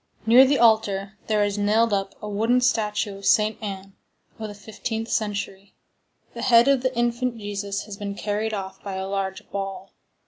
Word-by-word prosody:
Near 245 +4 +8
the 280 +1 +3
altar 215 -4 +2
there 215 -1 +2
is 205 0 -1
nailed 215 +2 +2
up 195 -1 -1
a - - -4
wooden 225 +4 +2
statue 210 -4 0
of 200 - -10
Saint 215 +1 +3
Anne, 195 -2 -6 0.5
of 220 - -4
the 205 - -9
fifteenth 220 +2 -5
century; 200 -2 -3 0.6
the - - -6
head 235 0 +5
of 275 -2 +4
the 255 -1 -2
infant 240 0 0
Jesus 205 -1 -4
has 205 -2 -9
been 200 -1 -5
carried 210 +2 -2
off 190 -2 -6
by 195 -2 -5
a 190 0 -3
large 195 -1 -3
ball. 195 -1 -5
210 Hz, 180 wpm, -24 LUFS, 200-225 Hz, 0.6 s, Near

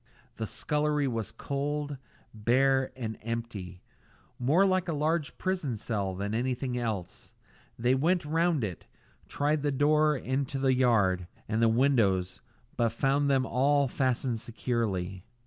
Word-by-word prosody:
The 110 - -3
scullery 150 +1 0
was 115 -4 -3
cold, 145 +1 -3 0.4
bare, 130 +4 +2
and 110 -4 -5
empty; 110 -6 -5 0.6
more 150 +10 +4
like 185 -1 +1
a 165 - -1
large 155 +1 -1
prison 175 -11 -2
cell 100 -4 -2
than 100 +3 -3
anything 125 +2 -1
else. 110 -8 -4 0.4
They 120 +2 +2
went 165 +6 +2
round 165 -2 +1
it, 95 -5 -5 0.4
tried 145 +1 0
the 145 0 0
door 150 +2 +3
into 135 +2 -2
the 135 -1 +2
yard, 100 -8 +2 0.2
and 110 +1 0
the 115 - +5
windows, 110 -7 +2 0.3
but 115 -1 +2
found 135 +5 +1
them 135 -2 +3
all 140 +2 +2
fastened 125 -2 0
securely. 105 -6 -2
130 Hz, 135 wpm, -29 LUFS, 110-145 Hz, 0.6 s, the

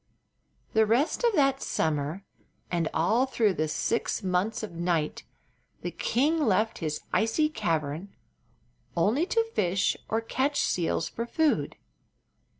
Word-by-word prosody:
The 220 -1 +4
rest 255 - +1
of 470 -3 +3
that 275 -3 +3
summer 155 +4 -1 0.5
and 170 -2 0
all 225 +11 +2
through 220 -6 +2
the 155 -2 -1
six 220 +8 -1
months 190 +4 0
of 215 - -5
night 170 -2 -1 0.6
the - - -2
king 300 +7 +1
left 215 -1 +1
his 155 -2 -3
icy 230 +8 +2
cavern 165 - -2 0.9
only 225 - +2
to 455 +2 +2
fish 185 +1 +1
or 225 - +1
catch 265 +5 -1
seals 165 -2 0
for 235 +1 -5
food. 315 +3 +1
210 Hz, 130 wpm, -28 LUFS, 170-260 Hz, 0.9 s, The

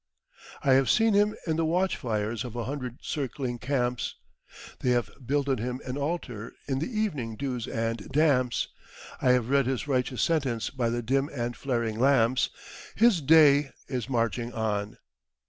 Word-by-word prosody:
"I 135 -2 +5
have 135 0 +4
seen 225 -1 +4
Him 205 +1 +3
in 160 -2 0
the 165 - +1
watch 180 +4 +1
fires 110 0 -2
of 120 -2 -7
a 120 - -2
hundred 130 -2 -5
circling 130 -3 -3
camps; 125 -2 -1 0.6
They 125 - 0
have 120 -1 0
builded 140 -1 0
Him 125 +3 -3
an 125 - -4
altar 140 -7 -4
in 135 -2 0
the 155 - -2
evening 165 - -2
dews 125 -2 -3
and 115 -2 -3
damps; 135 -5 +2 0.5
I 125 - +5
have 125 -2 +1
read 140 -2 +3
His 130 +1 -2
righteous 130 -2 0
sentence 135 -9 0
by 125 -4 -1
the 120 +1 -2
dim 135 +5 +1
and 120 -3 -3
flaring 115 -5 -2
lamps: 130 -2 +3 0.5
His 220 -6 +4
day 145 -1 +6 0.2
is 125 -2 -3
marching 120 -1 0
on. 105 -2 -2
130 Hz, 165 wpm, -27 LUFS, 120-145 Hz, 0.6 s, day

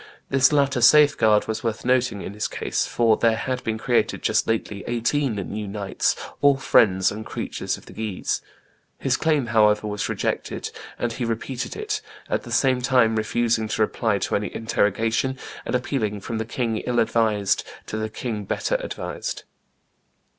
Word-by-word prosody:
This 130 0 +5
latter 140 -3 +2
safeguard 120 -6 +6
was 110 0 -3
worth 115 0 -2
nothing 125 -5 +1
in 95 - -6
his 105 0 -2
case, - - -2
for 115 -2 +3
there 115 -1 +3
had 125 +2 -3
been 110 -1 -1
created, 120 +1 0
just - - +2
lately, 105 -2 -2
eighteen 120 +2 0
new 100 +2 -4
knights, 100 -1 -1 0.3
all 140 -1 +5
friends 95 -8 +4
and 105 +2 -6
creatures - - -4
of - - -16
the - - -12
Guises. 110 -4 -2 0.6
His 130 -2 +1
claim, 155 -3 +1
however, 105 -2 +3
was 105 0 -2
rejected; - - -2 0.3
and 120 -1 -2
he 125 - -4
repeated 120 +2 -3
it, 430 0 -3 0.3
at - - +1
the - - -10
same 130 -2 +2
time 125 -3 +3
refusing 110 0 +1
to 110 - -2
reply 110 -1 0
to 100 - -1
any 105 +1 -1
interrogation, 115 +4 0 0.3
and - - 0
appealing 115 -5 -1
"from 110 +3 -4
the 110 - -2
king 115 -1 -2
ill 120 +2 -2
advised 110 -4 +2 0.2
to - - -6
the 110 0 -2
king 110 -2 -4
better - - -1
advised." - - -5
115 Hz, 170 wpm, -24 LUFS, 105-130 Hz, 0.6 s, safeguard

